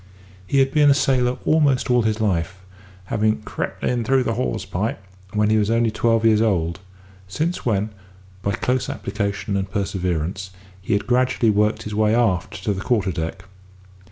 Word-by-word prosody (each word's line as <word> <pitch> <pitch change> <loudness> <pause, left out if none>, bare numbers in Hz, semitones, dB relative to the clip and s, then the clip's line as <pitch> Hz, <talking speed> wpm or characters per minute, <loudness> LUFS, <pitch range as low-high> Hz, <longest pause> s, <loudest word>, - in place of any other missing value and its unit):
He 140 - 0
had 135 0 +3
been 150 -1 +4
a 140 - +6
sailor 125 -3 +1
almost 140 -5 +2
all 125 0 +4
his 110 -1 0
life, 95 -3 -1 0.5
having 110 +2 0
"crept - - -5
in 120 -2 0
through 130 +3 +2
the 115 - -1
hawse 125 +3 -2
pipe" 95 +3 -2 0.3
when 105 0 +2
he 110 - +4
was 105 0 +1
only 115 0 +2
twelve 115 0 +1
years 110 -1 +4
old; 90 -5 0 0.5
since 155 - -2
when, 105 -1 0 0.5
by 100 +1 -1
close 125 +4 -1
application 100 0 -3
and 95 -1 -2
perseverance, 95 -2 -2 0.3
he 95 - -1
had 100 - 0
gradually 125 -2 +2
worked 105 +2 +1
his 105 - -6
way 110 +1 +2
aft 105 -8 0
to 105 - 0
the 95 - -5
quarter 100 -4 +1
deck. 80 -1 -4
110 Hz, 175 wpm, -22 LUFS, 100-120 Hz, 0.5 s, a